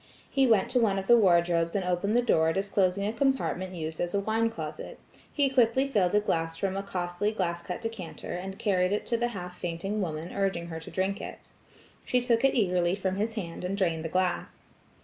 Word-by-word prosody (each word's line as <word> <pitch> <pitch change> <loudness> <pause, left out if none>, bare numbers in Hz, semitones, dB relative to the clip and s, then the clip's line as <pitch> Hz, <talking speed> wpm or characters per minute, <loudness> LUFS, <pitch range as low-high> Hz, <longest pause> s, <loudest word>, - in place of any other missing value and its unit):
He 270 -1 +3
went 220 -5 +4
to 250 - +3
one 210 -4 +2
of 195 - -2
the 240 - +7
wardrobes 170 -5 +3
and 195 -2 0
opened 180 +5 +1
the 245 - +3
door 160 -8 +3
disclosing 195 0 +1
a 210 - -1
compartment 230 -8 0
used 160 -1 -5
as 175 +2 -1
a - - +3
wine 220 +3 +1
closet. 225 - -7 0.3
He 285 -2 +2
quickly 260 0 +3
filled 205 -8 +1
a - - +6
glass 165 -5 -1
from 190 +1 -1
a 195 - -1
costly 180 +1 -2
cut 220 - -7
glass 170 -2 -1 0.2
decanter, 225 -6 -6
and 190 +2 -5
carried 185 -2 +1
it 210 - -1
to 235 - 0
the 240 +1 +1
half 180 -6 -7
fainting 185 +5 -3
woman 160 -1 -4
urging 190 -4 -1
her 160 -1 -5
to 160 - -9
drink 195 +2 -1
it. - - -9 0.5
She 250 - +1
took 240 -1 +1
it 270 - +4
eagerly 180 -5 +2
from 190 -1 -2
his 220 +2 -1
hand 170 -6 -5
and 190 +2 -2
drained 165 -5 0
the 165 - -3
glass. 180 +1 -2
195 Hz, 215 wpm, -28 LUFS, 175-225 Hz, 0.5 s, the